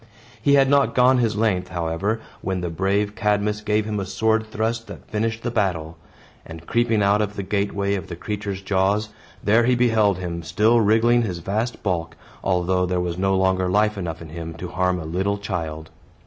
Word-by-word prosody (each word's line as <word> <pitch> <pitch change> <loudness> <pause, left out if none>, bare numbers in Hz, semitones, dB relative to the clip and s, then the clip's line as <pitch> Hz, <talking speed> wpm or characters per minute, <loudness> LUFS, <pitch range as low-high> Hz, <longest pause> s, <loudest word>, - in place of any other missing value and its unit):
He 140 0 +4
had 135 -1 +5
not 140 0 +3
gone 125 0 +5
his 115 -3 +1
length, 105 -5 +1
however, 90 +6 -2 0.2
when 95 -1 -2
the 90 -1 -3
brave 100 +4 0
Cadmus 105 +1 0
gave 105 0 0
him 105 -1 -2
a 95 - -3
sword 110 +2 +1
thrust 115 +1 -2
that - - -11
finished 110 +1 -2
the 120 - -2
battle; 85 -8 -1 0.5
and 80 0 -10
creeping 115 -1 +1
out 100 +1 +3
of 105 -1 -2
the 100 - -3
gateway 100 0 -1
of 95 - -3
the 85 - -6
creature's 100 +1 -5
jaws, 100 +2 +1 0.3
there 115 +3 +4
he 125 +1 +3
beheld 110 -5 +3
him 85 -2 -4
still 105 +8 +3
wriggling 115 +3 +4
his 95 -7 -2
vast 110 +8 -3
bulk, 85 -4 -2 0.3
although 90 0 +1
there 90 0 0
was 90 0 -3
no 95 0 +2
longer 95 -1 +2
life 105 +3 +2
enough 85 -4 -5
in 80 - -11
him 80 0 -7
to 85 +2 -6
harm 90 0 0
a 80 - -6
little 95 +5 -1
child. 80 -6 -5
100 Hz, 195 wpm, -23 LUFS, 90-110 Hz, 0.5 s, had